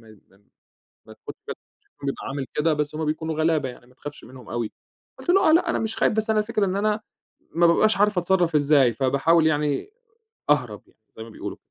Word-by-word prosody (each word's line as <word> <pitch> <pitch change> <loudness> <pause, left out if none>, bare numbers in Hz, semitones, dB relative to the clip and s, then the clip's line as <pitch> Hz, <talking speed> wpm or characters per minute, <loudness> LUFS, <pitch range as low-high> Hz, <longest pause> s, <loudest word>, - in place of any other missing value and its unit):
ما 110 -1 -17 1.0
ما - - -13 0.9
بيبقى 140 - -3
عامل 140 -1 -4
كده 155 +1 +1
بس 150 0 -2
هُم 160 - -2
بيكونوا 160 +1 -2
غلابة 155 -4 +1
يعني 120 -1 -13
ما 125 - -22
تخافش 145 +3 -10
منهم 125 -1 -13
أوي،" 115 -1 -3 0.5
قُلت - - -8
له: 385 -2 +5
"آه - - +6
لأ 335 - +3
أنا - - 0
مش 220 0 -3
خايف - - +2
بس 220 0 -1
أنا 220 - +3
الفكرة 210 -1 0
إن 185 - -2
أنا 210 +2 0 0.5
ما 170 0 +5
بابقاش 215 +5 +3
عارف 205 -1 +2
أتصرّف 175 -2 +1
إزاي 140 -5 +4
فباحاول 140 +6 +2
يعني 150 - -1 0.6
أهرب 125 -8 +1
يعني - - -29 0.2
زي 110 - -8
ما 115 - -9
بيقولوا." - - -7
155 Hz, 195 wpm, -24 LUFS, 135-200 Hz, 1.0 s, آه